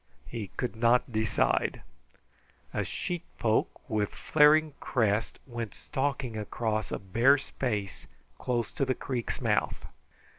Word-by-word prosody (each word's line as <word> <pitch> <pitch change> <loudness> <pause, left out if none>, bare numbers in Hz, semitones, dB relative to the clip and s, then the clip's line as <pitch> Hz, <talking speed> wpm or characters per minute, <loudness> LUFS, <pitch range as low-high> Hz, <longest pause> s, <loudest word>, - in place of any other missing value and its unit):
He 115 -4 -5
could 125 -2 -2
not 120 +2 +3
decide. 110 -1 +1 0.9
A - - -1
sheitpoke, 165 -11 -1
with 105 -2 0
flaring 155 0 +5
crest, 110 -3 +1
went 120 -4 -5
stalking 135 -4 -2
across 110 0 -2
a - - -1
bare 115 +9 +4
space 105 -8 -3 0.3
close 120 -6 -1
to - - -1
the 130 -1 +1
creek's 125 -3 -3
mouth. - - 0
120 Hz, 115 wpm, -29 LUFS, 110-135 Hz, 0.9 s, flaring